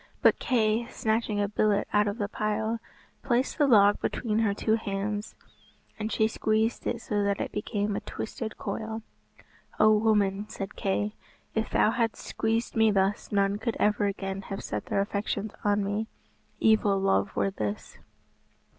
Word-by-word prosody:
But - - +5
Kay, 230 -2 +1
snatching 220 -2 -1
a 205 - +2
billet 210 0 +1
out 210 0 +4
of 205 +2 -2
the 205 -3 -1
pile, 220 +2 -1 0.4
placed 255 +2 0
the 290 - +5
log 205 -5 +5
between 220 -3 -1
her 220 -3 +2
two 220 +2 0
hands, 205 -1 -2 0.6
and 215 +1 -2
she 220 - +3
squeezed 220 +1 0
it 235 -1 -2
so 205 -1 0
that 200 -1 0
it - - -3
became 210 -1 -2
a - - -1
twisted 220 0 -6
coil. 220 +2 -4 0.8
"O 215 0 +6
woman," 210 -2 +2
said 195 -2 -6
Kay, 205 +2 -1 0.4
"if 220 0 -1
thou 215 - +3
hadst 230 -2 -1
squeezed 225 +1 -1
me 220 -1 +5
thus, 195 0 +1
none 200 0 +2
could 230 0 -2
ever 210 0 +2
again 195 -1 -3
have 195 0 -6
set 105 0 -4
their 195 - +1
affections 200 +1 -2
on 205 0 +2
me. 205 +3 -2 0.5
Evil 215 -3 +4
love 100 - +1
were 195 - +1
this." 105 - -5
210 Hz, 165 wpm, -28 LUFS, 200-220 Hz, 0.8 s, O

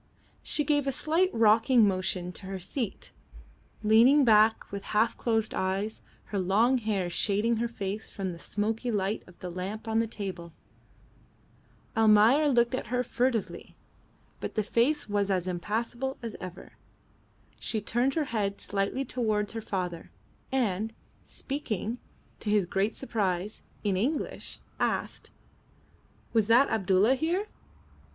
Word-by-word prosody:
She 300 - 0
gave 290 -2 +1
a - - +2
slight 325 +7 +2
rocking 225 +1 +5
motion 185 -2 -1
to 190 +1 -9
her 195 0 -4
seat, 195 +4 -4 0.7
leaning 240 +7 +6
back 220 -1 +4
with 200 0 -5
half 225 +2 +3
closed 225 -2 0
eyes, 195 +3 -2 0.2
her 200 - -3
long 220 +8 +3
hair 210 -5 -1
shading 210 +6 +1
her 235 +2 0
face 210 -2 -5
from 195 -3 -4
the 170 - -9
smoky 220 +6 -2
light 205 -1 0
of 180 - -16
the 180 - -5
lamp 195 +6 -5
on 225 0 +1
the 230 - +1
table. 190 -6 -6 1.4
Almayer 225 +7 +5
looked 240 -2 +3
at 255 - -2
her 250 +2 0
furtively, 240 -2 -2 0.6
but - - -5
the 215 - +1
face 240 +8 +1
was 205 -1 0
as 185 -2 0
impassible 230 +8 -2
as 230 -2 -5
ever. 185 -1 -8 0.9
She 220 - -2
turned 240 +6 0
her 320 - +2
head 200 -3 -1
slightly 200 +7 -2
towards 215 -5 -1
her 225 - -4
father, 180 -5 -4 0.4
and, 225 -4 0 0.3
speaking, 245 -4 -3 0.4
to 210 - -3
his 205 -3 +3
great 195 +4 0
surprise, 205 -5 -2 0.2
in 200 -3 +1
English, 265 +11 -2 0.2
asked - - -2 1.0
"Was 220 -3 +3
that 240 +5 +5
Abdulla 200 +2 +3
here?" 335 +9 0
215 Hz, 140 wpm, -28 LUFS, 195-240 Hz, 1.4 s, leaning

